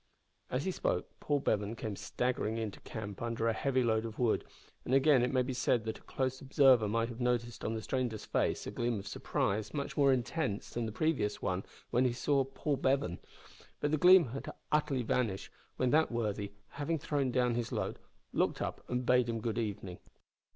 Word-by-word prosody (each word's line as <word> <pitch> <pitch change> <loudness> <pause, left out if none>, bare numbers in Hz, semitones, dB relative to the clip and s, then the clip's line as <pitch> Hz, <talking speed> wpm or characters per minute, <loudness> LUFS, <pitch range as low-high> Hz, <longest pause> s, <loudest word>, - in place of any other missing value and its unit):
As 130 +4 -1
he 190 - +1
spoke - - -1
Paul 145 -2 0
Bevan 105 -1 0
came 110 -3 -4
staggering 120 0 -1
into 110 -3 -4
camp 105 -3 -7
under 115 -1 -1
a 115 - +3
heavy 130 +2 +1
load 110 -2 +2
of 115 -1 -6
wood, 120 -3 +2 0.4
and 130 - +1
again 135 -1 +5
it 125 - +1
may 130 -1 +3
be 130 +1 -3
said 125 -2 +1
that 110 0 -4
a - - -24
close 130 0 -2
observer 135 -5 +5
might 115 +2 0
have 120 +1 -7
noticed 120 -1 0
on 115 - -1
the 110 - -4
stranger's 125 -5 -2
face - - 0
a - - -4
gleam 120 -1 -1
of 100 - -6
surprise 105 +1 -1
much 140 -1 -3
more 140 -2 +5
intense 125 -3 -1
than 120 -1 -2
the - - -4
previous 120 -4 0
one 95 +1 -1 0.3
when 125 +2 +3
he 125 - +2
saw 135 +2 +2
Paul 135 +2 -2
Bevan. 130 -12 +1 0.6
But 145 - 0
the 155 - +3
gleam 180 -5 +7
had 135 +4 -5 0.2
utterly 150 -4 +1
vanished 110 -4 -1 0.3
when 130 -1 +2
that 160 -1 +4
worthy, 105 -3 -2 0.2
having 150 +3 -2
thrown 140 -2 0
down 125 -1 +2
his 120 -1 -2
load, - - -2 0.3
looked - - +1
up - - -4
and 125 0 -1
bade 125 -1 +4
him 115 -1 -1
good 115 +1 -2
evening. 100 -5 -4
120 Hz, 200 wpm, -33 LUFS, 110-135 Hz, 0.6 s, gleam